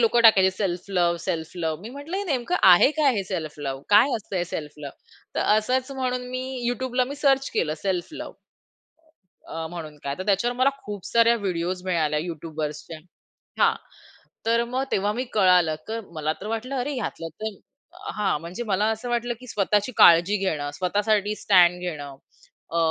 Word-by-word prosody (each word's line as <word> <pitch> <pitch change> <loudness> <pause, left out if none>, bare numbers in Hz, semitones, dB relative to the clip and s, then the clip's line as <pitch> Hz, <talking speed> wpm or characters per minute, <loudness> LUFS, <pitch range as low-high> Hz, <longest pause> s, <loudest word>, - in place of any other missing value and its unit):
लोकं 235 +1 +4
टाकायचे, 195 -5 +7
"self 185 -2 -2
love, 175 -2 +2
self 165 -2 -3
love." 160 -1 -2
मी 220 - -7
म्हटलं 285 +7 -6
हे 405 - -2
नेमकं 285 +2 -1
आहे 175 +10 +7
काय 285 -4 +4
हे 200 - 0
सेल्फ 165 -6 -4
लव्ह? 135 -2 -4
काय 210 +7 +6
असतं 200 -2 -6
हे 175 - 0
सेल्फ 155 -4 -6
लव्ह? 140 -2 -7 0.4
तर - - 0 0.2
असंच 255 +5 0
म्हणून 250 -1 -2
मी 255 0 -3 0.3
YouTubeला 255 0 0
मी 280 - -5
सर्च 275 -2 +2
केलं 155 -1 0
सेल्फ 185 -3 -1
लव्ह - - -7 1.1
अ, 160 0 -5
अ, - - -4
म्हणून 160 -3 -8
काय. 140 0 -3
तर 185 - -4
त्याच्यावर 210 +5 +1
मला 260 +2 +4
खूप 205 -3 -7
साऱ्या 235 0 +4
व्हिडिओज 180 -3 -2
मिळाल्या 155 -4 +1
YouTubeर्सच्या. 155 -1 -5 0.6
हां, - - +4 0.7
तर 230 +1 +3
मग 255 +2 -2
तेव्हा 205 +2 +1
मी 250 +3 -2
कळालं. 180 -6 +4
तर 225 +1 -3
मला 155 0 -1
तर 210 - -6
वाटलं 225 +5 -3
अरे 285 +4 -2
ह्यातलं 165 -6 -4
तर 220 -3 -4 0.6
हां, 205 -7 0
म्हणजे 180 +8 -6
मला 205 -1 0
असं 220 +3 -5
वाटलं 240 0 -1
की 250 - -13
स्वतःची 210 +1 0
काळजी 175 +5 +7
घेणं 155 -7 -2
स्वतःसाठी 205 +4 0
स्टँड 180 -4 +4
घेणं 145 -6 -6 0.6
अ, 170 - -1
195 Hz, 180 wpm, -24 LUFS, 170-240 Hz, 1.1 s, टाकायचे